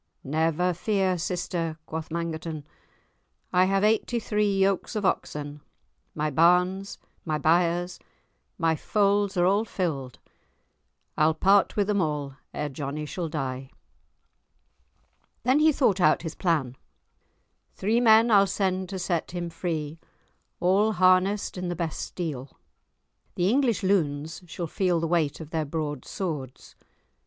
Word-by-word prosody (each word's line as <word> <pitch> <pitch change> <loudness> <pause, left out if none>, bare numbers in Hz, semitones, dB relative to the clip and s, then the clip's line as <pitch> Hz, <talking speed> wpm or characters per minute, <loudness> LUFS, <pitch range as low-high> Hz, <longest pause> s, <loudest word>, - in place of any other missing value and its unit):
"Never 160 +5 +1
fear, 190 +1 0
sister," 165 -2 -3
quoth 160 0 -6
Mangerton, 165 -2 -4 0.9
"I 180 +1 +5
have 195 +1 +1
eighty 220 +3 +2
three 210 -2 0
yokes 195 +3 +1
of 210 -2 -1
oxen, 150 -4 -2 0.5
my 150 0 -1
barns, 180 +5 +2 0.3
my 155 -2 -1
byres, 175 +3 +1 0.6
my 165 -1 +2
folds 200 +2 +1
are 175 - +4
all 200 +4 +3
filled, 155 - -3 1.0
I'll 155 +1 +4
part 195 +4 +3
with 205 - +2
them 205 -1 +1
all 150 -4 -2 0.2
ere 150 - -3
Johnie 145 +2 -5
shall 165 +2 -4
die." 135 -3 -4 1.7
Then 255 +4 +3
he 310 +1 +5
thought 215 -10 +2
out 155 0 +4
his 160 -2 -4
plan. 150 -9 -1 1.0
"Three 220 +5 +1
men 230 0 +5
I'll 200 -2 +6
send 185 -1 -1
to 195 - -4
set 175 -2 -2
him 175 -1 -5
free, 165 -2 -4 0.6
all 200 +5 +3
harnessed 185 +1 +2
in 180 - -3
the 175 - -2
best 170 -2 -3
steel; 145 -7 -5 0.8
the 180 +3 +2
English 250 -5 +1
loons 160 -5 0
shall 170 +1 -5
feel 180 0 0
the 165 - -1
weight 160 -4 0
of 160 -1 -9
their 160 -1 0
broad 145 -3 -4
swords. 150 -9 -5
175 Hz, 135 wpm, -26 LUFS, 155-195 Hz, 1.7 s, I'll